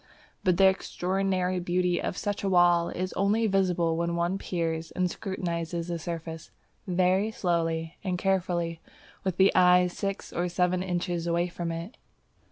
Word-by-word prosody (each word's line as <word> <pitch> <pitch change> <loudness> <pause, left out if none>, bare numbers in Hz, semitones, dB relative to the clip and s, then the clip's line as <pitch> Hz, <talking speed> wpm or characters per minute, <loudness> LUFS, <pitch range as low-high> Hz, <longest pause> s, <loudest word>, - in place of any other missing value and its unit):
But 180 -3 +3
the 195 - +6
extraordinary 190 -1 0
beauty 180 0 0
of - - -3
such 205 0 -3
a 195 - +1
wall 175 -2 +4
is 185 +1 -3
only 210 +4 +2
visible 180 -5 +2
when 170 +1 -1
one 175 +3 0
peers 165 -3 -2
and 185 0 0
scrutinizes 170 -3 -3
the 170 -1 -2
surface 165 -1 -6 0.4
very 185 +3 +2
slowly 165 -5 -1
and 185 -2 -1
carefully 175 -3 -1 0.4
with 190 -2 -2
the 190 +1 +6
eyes 180 -1 +5
six 195 -1 -4
or 175 +1 -1
seven 180 +1 +1
inches 175 -2 -2
away 170 +1 +1
from 170 -1 -4
it. 165 +7 -6
180 Hz, 155 wpm, -28 LUFS, 170-190 Hz, 0.4 s, the